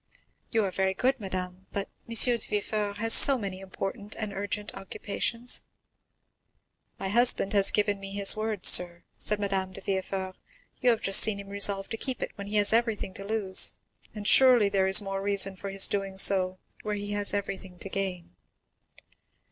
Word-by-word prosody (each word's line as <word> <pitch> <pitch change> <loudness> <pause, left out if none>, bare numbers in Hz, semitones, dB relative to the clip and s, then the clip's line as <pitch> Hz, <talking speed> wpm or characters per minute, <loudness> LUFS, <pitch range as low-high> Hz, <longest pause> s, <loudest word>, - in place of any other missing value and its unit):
"You 225 -3 -2
are 190 - -5
very 190 0 -3
good, 255 +5 -2
madame, 185 -2 -8
but 200 0 -5 0.2
M. 230 - -7
de 240 +1 +5
Villefort 205 0 -5
has 225 +1 +5
so 275 -2 +10
many 195 -4 -8
important 195 +2 -8
and 215 -2 -7
urgent 205 +1 -6
occupations." 230 +5 -4 1.4
"My 195 - -6
husband 235 -2 +2
has 200 -1 +1
given 205 -1 -2
me 195 0 -11
his 200 +1 +3
word, 215 -3 -6
sir," 175 -1 +4 0.2
said 210 0 0
Madame 195 -2 -4
de 195 - -11
Villefort; 190 -1 -6 0.4
"you 250 - 0
have 230 -2 -1
just 195 - +5
seen 210 -2 +4
him 200 0 -12
resolve 200 -1 +1
to 225 - -7
keep 260 +2 -5
it - - -7
when 200 -1 -11
he 210 - -6
has 205 0 +2
everything 225 -4 -2
to 195 - -11
lose, 200 -2 +2 0.4
and 205 -1 -8
surely 245 -4 +4
there 195 -1 -1
is 195 +2 +9
more 195 0 -6
reason 195 -1 -1
for 195 +1 -9
his 195 0 +2
doing 195 -1 -6
so 185 -1 +4 0.2
where 210 -1 -5
he 205 0 -8
has 205 0 0
everything 190 -2 -8
to 195 - -9
gain." 190 - -7
200 Hz, 180 wpm, -25 LUFS, 195-210 Hz, 1.4 s, so